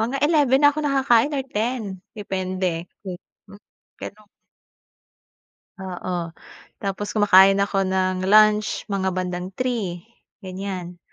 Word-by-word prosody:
mga 245 +5 -1
11:00 290 -5 +3
na 290 - +4
ako 305 - -3
nakakain 270 -2 +2
or 275 -3 -2
10:00 215 -4 -3 0.2
depende, 185 -3 -3 0.2
mm, 180 +2 -11 0.4
pero 215 0 -10 1.5
Oo, 180 -2 -5 0.5
tapos 200 +2 -4
kumakain 195 -2 +6
ako 195 -1 -1
ng 185 0 -1
lunch 215 +1 +4
mga 190 -1 -1
bandang 180 0 -3
3:00 215 -9 -3 0.4
ganyan. 185 -2 -6
195 Hz, 110 wpm, -22 LUFS, 185-225 Hz, 1.5 s, kumakain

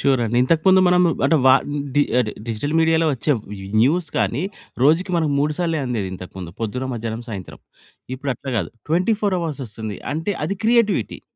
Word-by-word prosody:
Sure 135 -2 +2
అండి. 115 +2 -1
ఇంతకు 160 +4 +2
ముందు 190 0 +6
మనం 180 0 +4 0.2
అంటే, 160 +3 +4
వ - - +8 0.5
డి 145 - +5 0.2
అంటే 110 -4 0 0.2
డిజిటల్ 115 +8 -2
మీడియాలో 160 0 +3
వచ్చే 145 +4 +1 0.5
న్యూస్ 160 +7 +2
కాని, 115 - 0 0.4
రోజుకి 160 +7 +3
మనం 160 -3 +1
మూడు 150 +2 +1
సార్లు 165 -3 0
అందేది 110 -6 -2
ఇంతకుముందు 90 -1 -9
పొద్దున, 125 +4 -2
మధ్యాహ్నం, 115 0 -4
సాయంత్రం. 95 -4 -7 0.6
ఇప్పుడు 135 +1 -3
అట్లా 135 -2 -6
కాదు. 85 - -3 0.2
24 190 +4 +1
అవర్స్ 155 -4 -4
వస్తుంది. 110 -1 -6 0.2
అంటే, 165 +6 -2
అది 195 +5 -2
క్రియేటివిటీ. 220 - +2
145 Hz, 170 wpm, -21 LUFS, 115-165 Hz, 0.6 s, వ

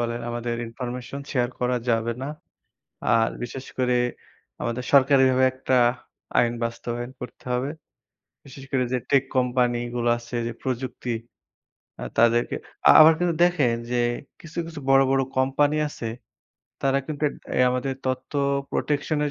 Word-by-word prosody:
বলেন 120 0 -2
আমাদের 120 0 -3
information 125 +3 -6
share 125 -2 +1
করা 125 0 +1
যাবে 115 0 +1
না। 140 - -3 0.8
আর 115 -1 +4
বিশেষ 130 +2 -6
করে 125 -1 +2 0.7
আমাদের 120 +1 -2
সরকারিভাবে 130 -1 +5
একটা 130 0 -1 0.6
আইন 120 -1 +3
বাস্তবায়ন 120 +1 -4
করতে 125 - -9
হবে। 130 +3 -1 0.8
বিশেষ 135 0 -11
করে 130 -2 +2
যে - - +3
tech 140 -1 +4
company 125 -1 +2 0.2
গুলা 120 0 +2
আছে 120 +1 -8
যে - - -3
প্রযুক্তি 125 -1 -3 0.9
আ - - -7 0.2
তাদেরকে 120 0 +3 0.3
আ - - +10
আবার 155 +1 +9
কিন্তু 175 -2 +1
দেখেন 145 -10 +2 0.2
যে 125 - 0 0.4
কিছু, 165 +1 -10
কিছু 160 -3 -8
বড়, 135 0 +6
বড় 135 0 +3 0.2
company 145 +3 +2
আছে 115 - -7 0.8
তারা 135 0 +3
কিন্তু 155 -1 -6
ডে - - -16
এই 125 - +5
আমাদের 125 +1 -1
তথ্য 130 +2 -3 0.4
protection-এর 150 0 0
125 Hz, 145 wpm, -24 LUFS, 120-135 Hz, 0.9 s, আ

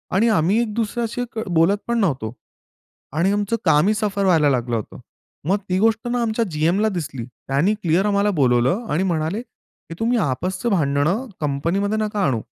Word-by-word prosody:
आणि 215 +5 +4
आम्ही 200 +1 +2
एक 225 -3 -3
दुसऱ्याशी 235 +2 -2
क 220 -1 -4
बोलत 170 +4 +3
पण 235 0 +1
नव्हतो 130 - -1 0.8
आणि 180 +4 +3
आमचं 205 +2 0
कामही 170 +8 +4
सफर 205 -2 -1
व्हायला 160 -6 +4
लागलं 120 -3 0
होतं. 110 - -5 0.5
मग 195 - +3
ती 185 +1 +1
गोष्ट 225 +2 +1
ना 245 0 0
आमच्या 230 0 0
जीएमला 170 +8 +1
दिसली. 155 - -4
त्यांनी 135 - -1
क्लिअर 185 -1 +1
आम्हाला 205 0 +2
बोलावलं 130 - +2
आणि 170 +5 +1
म्हणाले, 170 +3 -1
"की 240 - -16
तुम्ही 235 +2 +1
आपसचं 185 - -1
भांडणं 160 - +1 0.2
कंपनीमध्ये 170 +9 0
नका 210 -1 -2
आणू" 120 -7 0
190 Hz, 165 wpm, -21 LUFS, 150-215 Hz, 0.8 s, आणि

